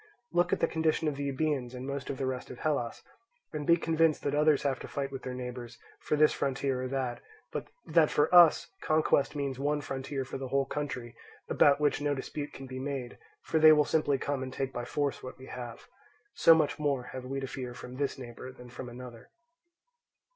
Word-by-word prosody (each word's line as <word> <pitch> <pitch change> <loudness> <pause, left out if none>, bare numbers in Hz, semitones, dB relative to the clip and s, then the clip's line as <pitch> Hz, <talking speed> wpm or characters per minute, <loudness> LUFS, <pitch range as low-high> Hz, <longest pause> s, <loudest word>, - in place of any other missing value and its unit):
Look 175 0 +2
at - - +1
the 165 - +4
condition 160 0 +1
of 150 - 0
the 140 0 -3
Euboeans 135 -3 -1
and 125 +1 -6
of 140 - -2
most 140 0 -5
of 135 - -3
the 135 - -2
rest 130 -1 -3
of - - -8
Hellas, 140 -6 -1 0.5
and 150 -2 -4
be 170 - +6
convinced 165 -1 +2
that 145 - 0
others 150 0 +4
have 135 -2 0
to - - -7
fight 140 -1 -3
with 135 -1 -6
their 130 -1 -5
neighbours 125 -1 -6 0.2
for - - 0
this 150 0 +5
frontier 135 -1 -1
or 130 - -2
that, 130 -2 -2 0.3
but - - -4 0.2
that 155 -1 +4
for 150 +4 +2
us 175 -3 +7
conquest 155 -2 +2
means 140 -3 -2
one 145 +1 +1
frontier 135 -1 -4
for 135 - -6
the 135 - -4
whole 135 +1 +1
country, 130 -4 -4 0.3
about 145 0 +5
which 145 -1 +1
no 145 0 +1
dispute 145 +2 -5
can 135 - -9
be 130 0 -6
made, 135 -2 -4 0.2
for 160 - +1
they 155 0 +9
will 150 -1 +5
simply 145 -3 +2
come 140 0 -2
and 130 0 -4
take 135 0 -3
by 120 - -4
force 145 +2 -1
what 130 - -8
we 130 - -11
have. 120 -3 -8 0.5
So 165 - +7
much 155 -1 +1
more 140 -4 0
have 130 -1 -6
we 135 +1 -3
to 135 - -3
fear 125 -2 -6
from 125 +1 -9
this 140 0 -1
neighbour 125 0 -8
than 125 -1 -13
from 125 +1 -7
another. 120 -1 -10
135 Hz, 220 wpm, -30 LUFS, 130-150 Hz, 0.5 s, they